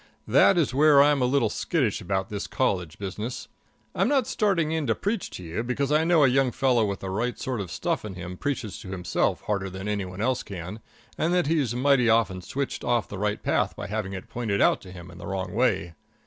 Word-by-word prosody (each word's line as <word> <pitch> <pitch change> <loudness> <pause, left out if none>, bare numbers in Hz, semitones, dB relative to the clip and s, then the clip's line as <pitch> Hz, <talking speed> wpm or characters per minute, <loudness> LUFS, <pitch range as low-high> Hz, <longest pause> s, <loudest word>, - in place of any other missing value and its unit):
That 195 - +5
is 150 -7 +2
where 145 +1 +6
I'm 145 -1 +5
a - - +3
little 130 -3 +2
skittish 130 - 0
about 95 0 -2
this 105 -1 -4
college 90 - -1
business. 105 +5 -5 0.5
I'm - - +1
not 280 -2 +2
starting 185 -8 +1
in 160 -3 -1
to 115 - +2
preach 205 0 -2
to 90 - -8
you, 85 +5 -3
because 130 +4 -1
I 155 +1 +4
know 165 -2 +4
a - - +7
young 130 0 +2
fellow 125 -2 +2
with 100 -1 -4
the 95 - -4
right 120 +5 -1
sort 125 -5 -3
of 95 - -6
stuff - - -2
in 105 -3 -6
him 90 0 -7
preaches 125 -4 -3
to 95 - -9
himself 90 -2 -1
harder 100 -2 -2
than 95 +2 -6
any 105 -2 -1
one 90 +1 -9
else 125 +3 +1
can, 95 +2 -7 0.4
and 170 +3 +2
that 180 - +2
he's 145 -6 +1
mighty 130 -2 +3
often 105 -5 +2
switched 135 +9 -4
off 120 -2 +1
the 100 - -6
right 105 0 -1
path - - +1
by - - -6
having 105 -1 -3
it 95 - -7
pointed 110 -5 -2
out - - +3
to 95 - -11
him 85 -1 -10
in 85 - -13
the - - -8
wrong 95 -2 -3
way. 100 -7 +1
115 Hz, 230 wpm, -26 LUFS, 95-140 Hz, 0.5 s, a